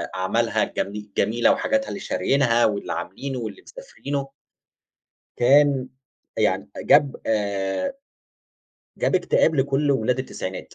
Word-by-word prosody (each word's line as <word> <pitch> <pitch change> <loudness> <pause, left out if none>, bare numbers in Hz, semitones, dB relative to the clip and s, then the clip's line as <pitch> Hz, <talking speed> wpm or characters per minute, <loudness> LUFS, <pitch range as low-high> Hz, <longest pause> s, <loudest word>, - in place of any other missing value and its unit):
أعمالها 95 0 +1
الجمي 105 +1 -4
جميلة 115 +4 +3
وحاجاتها 275 0 0
اللي 200 - -5
شاريينها، 130 -9 +2
واللي 100 -5 -1
عاملينه، 125 +10 -5
واللي 110 -4 -6
مسافرينه 140 - -6 1.1
كان 135 0 +4 0.5
يعني - - 0
جاب 145 -2 +4
آآ 100 - -1 1.1
جاب - - +1
اكتئاب 175 -3 +3
لكل 140 +1 +1
ولاد 125 -1 +1
التسعينات 95 -7 -6
130 Hz, 105 wpm, -23 LUFS, 105-145 Hz, 1.1 s, كان